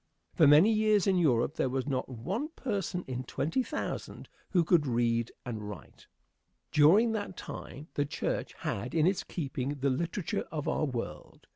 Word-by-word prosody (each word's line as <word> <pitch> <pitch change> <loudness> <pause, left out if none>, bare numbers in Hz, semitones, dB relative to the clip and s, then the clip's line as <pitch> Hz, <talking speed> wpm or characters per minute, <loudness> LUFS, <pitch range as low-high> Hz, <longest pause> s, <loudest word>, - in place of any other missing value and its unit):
For 160 -5 +5
many 155 +10 +7
years 215 -2 +3
in 190 -2 +3
Europe 135 -3 +2
there 130 - +1
was 130 0 -1
not 130 -3 -2
one 180 - -3
person 195 -7 -2
in 130 -1 -3
twenty 155 - -1
thousand 305 +4 -5 0.2
who 175 -3 +3
could 155 -3 +3
read 115 -1 +1
and 110 -4 -5
write. 100 -5 -11 0.6
During 190 +11 +6
that 205 -4 -4
time 145 +3 -8
the 145 - 0
church - - -3
had 120 +8 -3
in 160 -1 +4
its 190 +1 +2
keeping 140 -3 -3
the 140 -1 0
literature 170 +6 -2
of 150 -2 -3
our - - +1
world. 115 - -6
150 Hz, 165 wpm, -30 LUFS, 125-185 Hz, 0.6 s, many